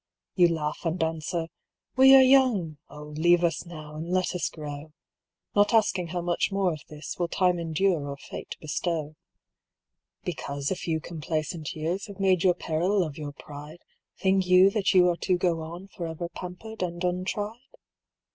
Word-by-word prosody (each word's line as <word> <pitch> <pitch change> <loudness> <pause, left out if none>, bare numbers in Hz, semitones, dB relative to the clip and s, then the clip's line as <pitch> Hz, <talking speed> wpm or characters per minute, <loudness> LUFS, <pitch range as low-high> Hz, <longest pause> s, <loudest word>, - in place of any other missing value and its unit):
"You 180 -2 +5
laugh 155 -3 -2
and 165 0 0
answer, 160 +1 -2 0.5
'We 265 +1 +8
are 265 - +9
young; 245 - +3
O 150 +1 -10
leave 165 +4 +2
us 170 0 0
now, 155 -3 -9
and 165 +2 -5
let 185 0 +1
us 180 - -1
grow.' 150 0 -8 0.6
Not 205 +3 +4
asking 190 -5 +2
how 175 +1 -3
much 175 +3 0
more 195 -3 +1
of 155 - -7
this 150 -1 -7
Will 175 - +1
Time 180 0 +2
endure 165 -1 0
or 140 - -5
Fate - - -8
bestow. 155 0 -3 1.1
"Because 140 +2 -3
a - - +1
few 165 -3 -2
complacent 155 -1 -4
years 170 +6 -2
Have 200 -1 -11
made 185 -3 +3
your 180 -2 +4
peril 180 +4 +1
of 155 -4 -5
your 145 -1 -5
pride, 150 +4 -11 0.3
Think 190 -1 +2
you 185 +2 +7
that 200 -2 +1
you 180 -1 +7
are 175 -1 +1
to 185 0 +1
go 175 -2 0
on 170 +4 -8
Forever 170 -2 -5
pampered 180 +5 -8
and 175 0 -3
untried? 190 +5 -2
175 Hz, 170 wpm, -27 LUFS, 155-185 Hz, 1.1 s, are